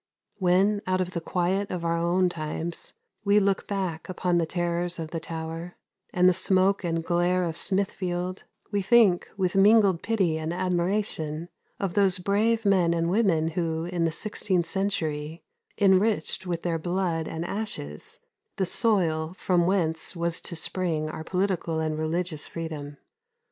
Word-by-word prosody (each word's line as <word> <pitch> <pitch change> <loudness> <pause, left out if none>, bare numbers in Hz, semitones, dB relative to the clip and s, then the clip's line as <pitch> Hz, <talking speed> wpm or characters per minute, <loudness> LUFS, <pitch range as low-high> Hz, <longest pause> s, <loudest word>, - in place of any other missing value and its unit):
When, 195 +3 +3
out 185 0 +1
of 180 -1 -1
the 170 - -4
quiet 185 +4 -1
of 175 -2 -4
our 165 0 +1
own 175 +2 +2
times, 165 0 -4 0.3
we 205 0 +4
look 195 -1 0
back 185 -5 -3
upon 180 -1 0
the 165 - 0
terrors 175 0 -1
of 160 -2 -6
the 165 - -3
Tower, 165 +1 -6 0.4
and 180 0 +4
the 185 - +6
smoke 190 +2 +4
and 165 -1 -1
glare 175 +1 +1
of 165 -2 -2
Smithfield, 185 -1 -1 0.3
we 205 -1 +1
think 195 -3 +4
with 185 -2 0
mingled 200 -3 +5
pity 190 -8 0
and 160 +1 -3
admiration 175 -3 -1 0.3
of 195 -3 -2
those 200 -2 +3
brave 215 +4 +1
men 180 -4 +3
and 170 +1 0
women 180 -7 +2
who, 165 -1 -2
in 175 -1 -2
the 165 - +1
sixteenth 185 0 0
century, 165 -4 -2 0.3
enriched 195 -2 +2
with 170 -1 -3
their 165 -2 -1
blood 175 -1 -1
and 160 +1 -4
ashes 175 - -3 0.3
the 190 - 0
soil 175 -6 +1
from 175 -2 +2
whence 165 -3 +1
was 170 0 0
to 170 - -7
spring 160 -2 -1
our 160 - -6
political 180 -2 -1
and 155 -1 -2
religious 160 0 -2
freedom. 150 -3 -6
175 Hz, 155 wpm, -26 LUFS, 165-190 Hz, 0.4 s, the